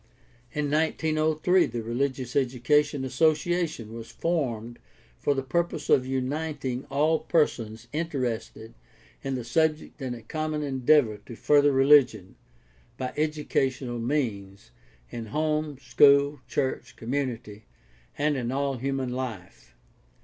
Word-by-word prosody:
In 150 Hz, -1 st, -2 dB
1903 155 Hz, +2 st, +2 dB
the 115 Hz, -1 st, -5 dB
Religious 130 Hz, +2 st, -2 dB
Education 140 Hz, +2 st, +1 dB
Association 155 Hz, -3 st, 0 dB
was 115 Hz, -1 st, -8 dB
formed 120 Hz, -9 st, -2 dB, 0.4 s
for 145 Hz, -, +1 dB
the 135 Hz, -, -2 dB
purpose 160 Hz, +2 st, -1 dB
of 130 Hz, -1 st, +4 dB
uniting 135 Hz, 0 st, -3 dB
all 155 Hz, +4 st, +2 dB
persons 120 Hz, -9 st, 0 dB
interested 130 Hz, -8 st, -3 dB, 0.5 s
in 135 Hz, -1 st, -2 dB
the 125 Hz, -, -4 dB
subject 155 Hz, +4 st, 0 dB
in 130 Hz, -2 st, -3 dB
a 115 Hz, -, -11 dB
common 155 Hz, +4 st, -3 dB
endeavor 135 Hz, -4 st, +3 dB
to 120 Hz, -, -8 dB
further 145 Hz, +3 st, +4 dB
religion, 135 Hz, -8 st, +4 dB, 0.6 s
by 130 Hz, -1 st, -4 dB
educational 135 Hz, -5 st, -1 dB
means, 115 Hz, -7 st, -3 dB, 0.4 s
in 115 Hz, -1 st, -6 dB
home, 155 Hz, +2 st, -1 dB
school, 140 Hz, +2 st, +4 dB
church, 125 Hz, -3 st, -2 dB
community, 115 Hz, -4 st, -4 dB, 0.5 s
and 150 Hz, +1 st, +1 dB
in 125 Hz, -2 st, -2 dB
all 135 Hz, 0 st, -1 dB
human 135 Hz, 0 st, -2 dB
life. 110 Hz, -, -7 dB
135 Hz, 115 wpm, -27 LUFS, 120-150 Hz, 0.6 s, of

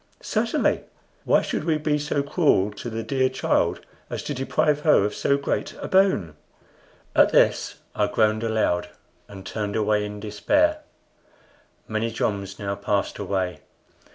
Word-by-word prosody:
"Certainly. -, -, 0 dB, 0.4 s
Why -, -, +4 dB
should -, -, -2 dB
we 160 Hz, -1 st, +1 dB
be 150 Hz, -1 st, 0 dB
so 145 Hz, -1 st, -1 dB
cruel 140 Hz, -, +2 dB
to 110 Hz, +3 st, -7 dB
the 115 Hz, 0 st, -4 dB
dear 130 Hz, +3 st, +1 dB
child 130 Hz, -, 0 dB, 0.3 s
as -, -, -4 dB
to 145 Hz, -, -3 dB
deprive 145 Hz, +2 st, +1 dB
her 150 Hz, -9 st, +4 dB
of 105 Hz, -, -2 dB
so 140 Hz, -, +1 dB
great 140 Hz, -, -2 dB
a -, -, -5 dB
boon?" 185 Hz, -, +2 dB, 0.8 s
At -, -, +6 dB
this -, -, +3 dB, 0.2 s
I -, -, +1 dB
groaned 110 Hz, 0 st, +2 dB
aloud 110 Hz, -6 st, 0 dB, 0.4 s
and 95 Hz, -2 st, -11 dB
turned 105 Hz, -1 st, -3 dB
away 105 Hz, -1 st, +1 dB
in 105 Hz, 0 st, -6 dB
despair. 295 Hz, -, +1 dB, 1.1 s
Many 110 Hz, +1 st, -1 dB
joms 100 Hz, -3 st, -2 dB
now 100 Hz, -1 st, -3 dB
passed 100 Hz, 0 st, -1 dB
away. 95 Hz, -2 st, -2 dB
110 Hz, 150 wpm, -24 LUFS, 100-140 Hz, 1.1 s, At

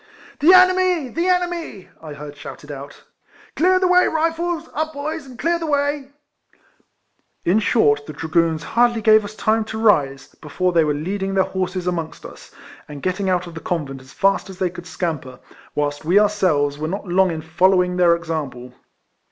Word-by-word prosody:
" -, -, -23 dB
The 315 Hz, +5 st, +6 dB
enemy! 370 Hz, -5 st, +4 dB
The 335 Hz, +8 st, -2 dB
enemy! 350 Hz, -, -1 dB
" -, -, -31 dB
I 155 Hz, -2 st, -8 dB
heard 145 Hz, 0 st, -9 dB
shouted 145 Hz, 0 st, -10 dB
out.. 140 Hz, 0 st, -10 dB, 0.3 s
" -, -, -27 dB
Clear 370 Hz, +3 st, +3 dB
the 370 Hz, 0 st, +2 dB
way, 360 Hz, 0 st, +5 dB
Rifles! 330 Hz, +1 st, -1 dB
Up 315 Hz, +1 st, -2 dB
boys, 295 Hz, +1 st, -5 dB
and 255 Hz, -2 st, -12 dB
clear 340 Hz, +7 st, 0 dB
the 330 Hz, -, -4 dB
way 285 Hz, -1 st, -1 dB, 0.7 s
!" -, -, -45 dB
In 190 Hz, +5 st, +3 dB
short, 145 Hz, -11 st, +2 dB
the 155 Hz, -, -7 dB
Dragoons 160 Hz, +1 st, 0 dB
hardly 235 Hz, +1 st, +1 dB
gave 215 Hz, 0 st, +6 dB
us 205 Hz, +1 st, -8 dB
time 220 Hz, 0 st, +1 dB
to 220 Hz, 0 st, -6 dB
rise, 145 Hz, -12 st, +1 dB
before 180 Hz, +4 st, -1 dB
they 165 Hz, -1 st, +4 dB
were 150 Hz, -1 st, 0 dB
leading 195 Hz, +5 st, -3 dB
their 190 Hz, -, +4 dB
horses 185 Hz, -1 st, -3 dB
amongst 170 Hz, -3 st, -4 dB
us, -, -, -12 dB, 0.4 s
and 145 Hz, -2 st, -10 dB
getting 185 Hz, +1 st, -1 dB
out 180 Hz, -1 st, 0 dB
of 170 Hz, -, -10 dB
the 165 Hz, -, -7 dB
convent 145 Hz, -7 st, -4 dB
as 130 Hz, 0 st, -16 dB
fast 195 Hz, +3 st, +1 dB
as 190 Hz, -, -10 dB
they 185 Hz, -2 st, -1 dB
could 175 Hz, -1 st, -10 dB
scamper, 155 Hz, -9 st, -4 dB, 0.4 s
wliilst 145 Hz, 0 st, -1 dB
we 175 Hz, +5 st, +3 dB
ourselves 175 Hz, -9 st, +1 dB
were 155 Hz, -, -2 dB
not 195 Hz, +4 st, -5 dB
long 185 Hz, +1 st, +3 dB
in 160 Hz, -2 st, -4 dB
following 180 Hz, +2 st, +2 dB
their 175 Hz, -2 st, +5 dB
example. 145 Hz, -7 st, -5 dB
185 Hz, 195 wpm, -20 LUFS, -, 0.7 s, The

